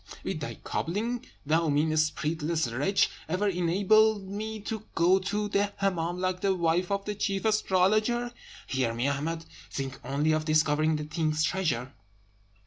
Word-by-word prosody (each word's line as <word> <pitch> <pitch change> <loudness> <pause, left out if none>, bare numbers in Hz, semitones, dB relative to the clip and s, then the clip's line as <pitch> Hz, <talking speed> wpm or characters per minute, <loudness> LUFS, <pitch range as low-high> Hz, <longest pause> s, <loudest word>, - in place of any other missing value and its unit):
"Will - - -2
thy - - -5
cobbling, 225 +8 -3 0.2
thou 160 +2 +2
mean, 155 +2 +2
spiritless 155 +1 0
wretch, 165 +11 +2 0.2
ever 185 +5 +1
enable 200 +4 +3
me 210 +3 -5
to 220 +1 -5
go 180 +3 +4
to 205 +2 -2
the 205 0 +1
Hemmâm 175 -3 0
like 185 0 -1
the 195 -1 +2
wife 170 +1 +1
of 200 0 -1
the 210 - -2
chief 195 0 -2
astrologer? 215 +3 +2 0.3
Hear 130 -4 -1
me, 120 +4 0
Ahmed! 160 +4 -2 0.2
Think 135 -1 -5
only 140 +4 +1
of 155 0 +1
discovering 155 0 +3
the 150 0 -3
king's 155 0 0
treasure. 140 -7 -1
175 Hz, 150 wpm, -28 LUFS, 155-200 Hz, 0.3 s, go